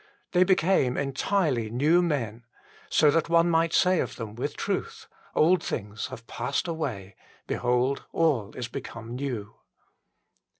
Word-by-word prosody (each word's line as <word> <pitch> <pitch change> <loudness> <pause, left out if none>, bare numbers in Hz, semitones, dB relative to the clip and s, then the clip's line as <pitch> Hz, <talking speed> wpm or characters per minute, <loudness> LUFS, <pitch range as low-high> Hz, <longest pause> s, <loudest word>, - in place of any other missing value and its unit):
They 180 0 +5
became 180 -8 +2
entirely 140 - 0
new 150 +9 +3
men, 120 - -2 0.5
so 150 - +5
that 165 +2 +1
one 170 0 +4
might 165 0 +2
say 185 -1 +3
of - - -2
them 110 -3 -6
with 120 - -4
truth: - - -3
" - - -29
Old 170 +2 +4
things 105 0 -4
have 115 - -10
passed 125 +9 -2
away: 100 - -4 0.3
behold, 125 +2 0
all 140 -11 +1
is 120 -2 -4
become 115 -1 -7
new." 125 -6 -4
135 Hz, 140 wpm, -27 LUFS, 115-165 Hz, 0.5 s, They